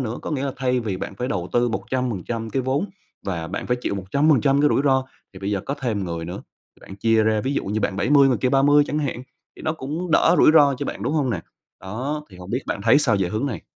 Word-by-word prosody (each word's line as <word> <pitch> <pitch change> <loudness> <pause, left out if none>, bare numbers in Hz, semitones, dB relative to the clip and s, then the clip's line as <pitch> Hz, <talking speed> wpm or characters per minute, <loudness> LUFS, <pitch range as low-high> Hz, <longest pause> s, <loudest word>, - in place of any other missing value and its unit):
nữa, 120 -2 -3
có - - -5
nghĩa 140 -2 -1
là 135 - -2
thay 125 -1 0
vì 105 -5 -3
bạn 100 - -6
phải 125 +1 -3
đầu 90 -2 -3
tư 120 0 +2
100% 115 -2 -3
cái 130 +4 -1
vốn 135 +9 0 0.4
và 85 -4 -3
bạn - - -5
phải 125 - +1
chịu 100 - -2
100% 135 +7 +2
cái 150 - +4
rủi - - +2
ro 130 -1 +3 0.3
thì 95 - -11
bây 100 +1 -3
giờ 100 -2 0
có 140 - -1
thêm 110 -6 -1
người 85 -1 -4
nữa, 90 +3 -6 0.4
bạn 95 - -11
chia 115 +1 +3
ra 110 -1 +2
ví 135 +4 -2
dụ - - -1
như 105 +2 -2
bạn 95 - -1
70 140 +5 +4
người 125 - +2
kia 125 - +1
30 145 +2 +5
chẳng 150 - -2
hạn, 130 -4 -3 0.3
thì - - -12
nó 155 - 0
cũng 160 +4 -5
đỡ - - +4
rủi - - +7
ro 145 -3 +6
cho 145 - -3
bạn, - - -5
đúng - - -1
hông 140 -5 +1
nè? - - -2 0.4
Đó, 130 +11 -4
thì 90 - -13
hông 90 +1 -10
biết 125 +3 -1
bạn 100 - -3
thấy 115 +6 +5
sao 115 -8 +3
về 90 -2 0
hướng 110 +8 -2
này? 115 - -4
125 Hz, 270 wpm, -22 LUFS, 100-140 Hz, 0.4 s, rủi